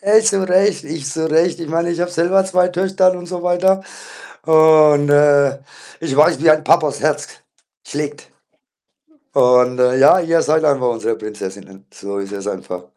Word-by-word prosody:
Ey, 210 +3 +3
zu 195 -4 0
recht 190 +1 +1
ich 150 -2 -7
zu 160 +1 -3
recht. 165 +2 0
Ich 165 - -7
meine, 170 +2 -2
ich 170 - -4
habe 175 0 -2
selber 175 +3 +1
2 180 -1 0
Töchter 185 +1 0
und 175 -1 -9
so 175 0 -7
weiter 190 +2 0 0.6
und, 155 -2 +4
äh, 145 -1 +3 0.4
ich 160 -5 -4
weiß, 150 -2 +3
wie 165 - +5
ein 155 0 +2
Papas 155 -2 +1
Herz 150 -1 -2 0.6
schlägt 145 0 -7 1.0
und, 125 0 +2
äh, 125 0 +2
ja, 145 +7 +5
ihr 165 -1 0
seid 155 +1 0
einfach 135 -4 +1
unsere 115 -1 -3
Prinzessinnen. 100 -2 -10
So 100 0 -7
ist 100 0 -7
es 100 0 -8
einfach. 90 -2 -7
155 Hz, 170 wpm, -17 LUFS, 135-175 Hz, 1.0 s, wie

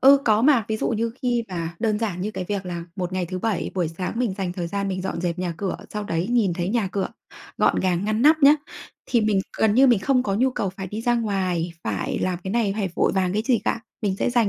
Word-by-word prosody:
Ừ, 275 +1 +8
có 215 0 +3
mà, 265 -6 +5
ví 220 - 0
dụ - - -1
như 230 0 -1
khi 240 -2 +1
mà 170 -2 -4
đơn 215 -2 +1
giản 205 -6 -2
như 205 +3 -2
cái 185 - -4
việc 200 -2 -2
là 170 -1 -4
một 180 -1 -3
ngày 185 -1 -1
thứ 185 +1 -4
Bảy 210 -3 -1
buổi 175 -4 0
sáng 180 +3 -4
mình 240 -6 0
dành 185 -2 -2
thời 175 -2 -3
gian 200 +3 -2
mình 185 -1 -3
dọn 185 -2 -3
dẹp 175 0 -2
nhà 180 -2 -2
cửa, 190 +3 -2
sau 210 -1 -4
đấy 170 0 -1
nhìn 225 -7 +3
thấy 175 +1 -2
nhà 215 -2 0
cửa 195 0 -1 0.5
gọn - - +3
gàng 185 0 +1
ngăn 215 +2 0
nắp 310 +3 +6
nhá, 285 +2 +9 0.5
thì 240 - +2
mình 210 -3 +2 0.2
gần 215 -2 +3
như 265 +3 +6
mình 240 -5 +5
không 255 +5 +2
có 200 -6 -1
nhu 255 +6 +2
cầu 205 -5 -2
phải 190 +1 -7
đi 210 +4 -5
ra 240 +1 +2
ngoài, 185 -7 -1
phải 105 -3 -2
làm 185 -1 -1
cái 190 - -3
này, 220 -2 +1
phải 200 -3 0
vội - - +2
vàng 185 -2 +1
cái 210 +2 0
gì 245 -1 +2
cả. - - 0 0.2
Mình 195 -3 0
sẽ - - 0
dành 240 -4 +3
200 Hz, 275 wpm, -24 LUFS, 180-230 Hz, 0.5 s, nhá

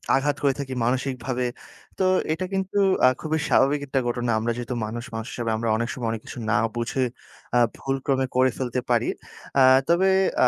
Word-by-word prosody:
আঘাত 145 +1 +1
করে 140 -1 +4
থাকি 135 -2 -4
মানসিকভাবে। 125 0 -1 0.5
তো 190 - +1 0.3
এটা 185 +3 -3
কিন্তু 190 +1 -2 0.3
আ - - +8
খুবই 155 0 -1
স্বাভাবিক 145 +2 +3
একটা 135 0 0
ঘটনা। 120 0 -1
আমরা 115 +2 -1
যেহেতু 120 0 -4
মানুষ, 115 +2 -5
মানুষ 115 +2 -4
হিসাবে 115 -2 -2
আমরা 115 0 -1
অনেক 115 +1 -2
সময়, 120 -3 -4
অনেক 110 -1 -4
কিছু - - -9
না 105 - +3 0.2
বুঝে 120 +2 -1 0.5
আ - - +5 0.2
ভুলক্রমে 135 0 -1
করে 130 0 +4
ফেলতে 125 -1 -2
পারি। 120 -2 +2 0.5
আ - - +6 0.3
তবে 175 +3 +3 0.4
আ - - +7
130 Hz, 185 wpm, -24 LUFS, 120-135 Hz, 0.5 s, আ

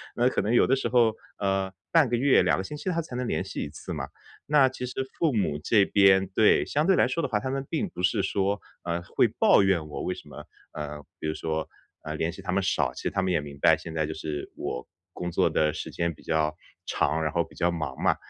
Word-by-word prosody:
那 120 +1 +3
可 - - 0
能 110 - 0
有 120 - +5
的 135 - +4
时 135 - -1
候， 115 -3 +4 0.2
呃， 95 -1 0 0.2
半 165 -4 +5
个 120 - +1
月、 135 +2 +4
2 - - +3
个 95 - -2
星 150 +10 -6
期 150 - -9
它 170 -1 0
才 155 -6 -9
能 125 0 -2
联 80 - -1
系 - - -5
1 - - -5
次 80 +4 -7
嘛。 70 -4 -4 0.4
那 145 -3 +5
其 130 -1 -6
实 125 +1 -3
父 160 -5 +2
母 95 -10 0
这 105 +1 +4
边 95 -1 +5
对， 100 +3 +4
相 150 +2 +1
对 190 - +5
来 - - +4
说 165 - -1
的 - - +1
话， 105 -4 +1
他 130 - -4
们 135 +1 -2
并 180 +4 -1
不 130 - -7
是 90 +3 +2
说， 100 +1 0 0.2
呃， 85 0 -2
会 85 - +2
抱 - - +4
怨 90 -5 +1
我 75 - -5
为 90 - -1
什 - - -13
么， - - -10 0.3
呃， 75 -1 -6 0.2
比 - - -3
如 75 - 0
说， 80 -1 -3 0.4
呃， 75 0 -4
联 80 +2 -1
系 95 - -10
他 95 - -3
们 100 +1 +2
少， 80 -8 +1
其 - - -8
实 - - -1
他 95 - 0
们 95 - 0
也 85 - +2
明 70 -1 -10
白， - - +6
现 80 - -8
在 80 -1 +1
就 80 - -4
是 75 -2 -5
我 60 - -4 0.2
工 90 0 -5
作 - - +2
的 75 -1 +2
时 - - -5
间 85 0 -1
比 - - -19
较 80 -1 0 0.3
长， 80 +2 0
然 75 - 0
后 85 - +1
比 - - -17
较 85 0 +1
忙 75 -6 -4
嘛。 - - +3
95 Hz, 280 characters per minute, -27 LUFS, 80-120 Hz, 0.4 s, 白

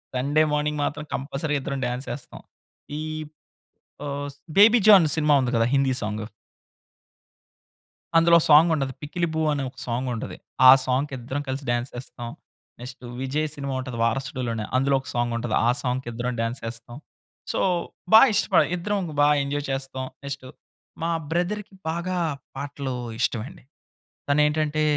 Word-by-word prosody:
Sunday 145 +5 +2
morning 150 0 0
మాత్రం 150 +1 -2
compulsory 145 +3 -3
ఇద్దరం 140 0 -4
dance 125 +2 -4
ఎస్తాం. 140 - -11 0.6
ఈ - - -3 1.1
ఆహ్, 145 0 -3 0.3
'బేబీ 220 +4 +8
జాన్' 190 -6 +9
సినిమా 150 -1 +3
ఉంది 125 -2 0
కదా 115 - +3
హిందీ 135 -1 +3
సాంగు. 105 0 -3 1.9
అందులో 170 +1 +6
సాంగుంటది 150 -3 +5
'పిక్కిలిబూ' 160 +1 -2
అనే 140 -1 -2
ఒక - - -22
సాంగ్ 125 +2 -2
ఉంటది. 110 - -6 0.3
ఆ - - +13
సాంగ్‌కి 135 +2 0
ఇద్దరం 130 +4 -4
కలిసి 135 +2 -3
డాన్స్ 120 +1 -1
ఎస్తాం. 120 -2 -8 0.5
నెక్స్ట్ 125 0 -10 0.2
విజయ్ 145 +4 -1
సినిమా 140 -1 -4
ఉంటది 130 -2 -5
వారసుడులోనే 125 -2 -2
అందులో 135 +1 +2
ఒక 130 - -13
సాంగ్ 120 0 0
ఉంటది. 115 -1 -2
ఆ - - +5
సాంగ్‌కి 125 0 -2
ఇద్దరం 125 +2 -2
డాన్స్ 115 +4 -3
ఎస్తాం. 120 +1 -8 0.5
సో - - -1 0.5
బా 220 - +12
ఇష్టపడ - - +4
ఇద్దరం 200 +4 -1 0.2
బాగా 145 0 +5
ఎంజాయ్ 145 +1 -3
చేస్తాం 135 -1 -4 0.2
నెక్స్ట్ 140 -1 -6 0.6
మా 170 - 0 0.2
బ్రదర్‌కి 195 +5 -2 0.2
బాగా 170 +3 -2 0.4
పాటలు 140 -2 -4 0.3
ఇష్టమండి. 130 +8 -2 0.7
తనేంటంటే 150 +1 +2
140 Hz, 135 wpm, -24 LUFS, 125-155 Hz, 1.9 s, ఆ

